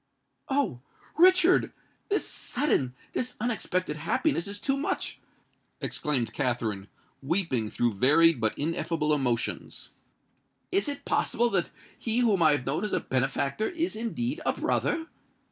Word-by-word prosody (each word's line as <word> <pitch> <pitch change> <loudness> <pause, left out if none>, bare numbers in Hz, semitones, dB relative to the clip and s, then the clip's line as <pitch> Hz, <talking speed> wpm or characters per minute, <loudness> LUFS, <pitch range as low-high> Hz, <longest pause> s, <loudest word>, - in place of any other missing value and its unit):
"Oh! 270 - 0 0.3
Richard—this 370 +3 +2
sudden—this 235 - -2
unexpected 185 -8 -1
happiness 170 - 0
is 200 +1 -6
too 270 +4 0
much!" 275 - -2 0.6
exclaimed 125 -7 -1
Katherine, 115 -7 -1 0.3
weeping 140 - 0
through 120 0 0
varied 150 +6 +5
but 110 -1 +1
ineffable 155 0 0
emotions. 125 -5 -2 0.8
"Is 385 -3 +1
it 285 - -6
possible 240 +1 +1
that 185 -3 +1 0.3
he 230 +1 0
whom 210 -7 +3
I 155 -2 +6
have 140 -4 -1
known 155 +7 -1
as 210 - -2
a - - +2
benefactor 135 - -1
is 340 -4 -2
indeed 235 +5 -3
a - - +1
brother!" 325 - 0
165 Hz, 125 wpm, -28 LUFS, -, 0.8 s, I